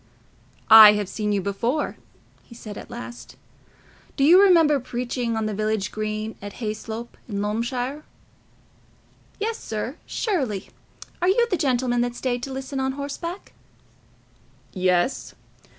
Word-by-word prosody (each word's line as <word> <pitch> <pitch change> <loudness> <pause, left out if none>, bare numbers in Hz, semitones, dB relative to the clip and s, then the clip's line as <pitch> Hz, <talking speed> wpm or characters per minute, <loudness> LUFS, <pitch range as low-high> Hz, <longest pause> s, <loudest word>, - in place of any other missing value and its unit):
"I 220 -1 +11
have 210 -2 -2
seen 210 +1 -2
you 200 -1 +1
before," 230 +9 -2 0.4
he 235 - -16
said 215 -3 -9
at - - -10
last. 240 0 -9 0.8
"Do 275 - +2
you 345 +7 +7
remember 330 -7 +5
preaching 245 -2 -3
on 220 - -1
the 215 - -2
village 215 0 -1
green 215 0 -4
at 205 0 -7
Hayslope 220 +1 -6
in 200 -2 -3
Loamshire?" 245 +7 -2 1.4
"Yes, 440 +2 -2
sir, 225 +6 -5
surely. 270 - -2 0.5
Are 355 - +3
you 470 +5 +3
the - - +3
gentleman 250 -5 +1
that 240 0 -2
stayed 245 -1 -2
to 270 - -5
listen 265 +1 -5
on 265 0 -1
horseback?" 290 +7 -6 1.2
"Yes. 185 +5 0
240 Hz, 135 wpm, -24 LUFS, 215-275 Hz, 1.4 s, I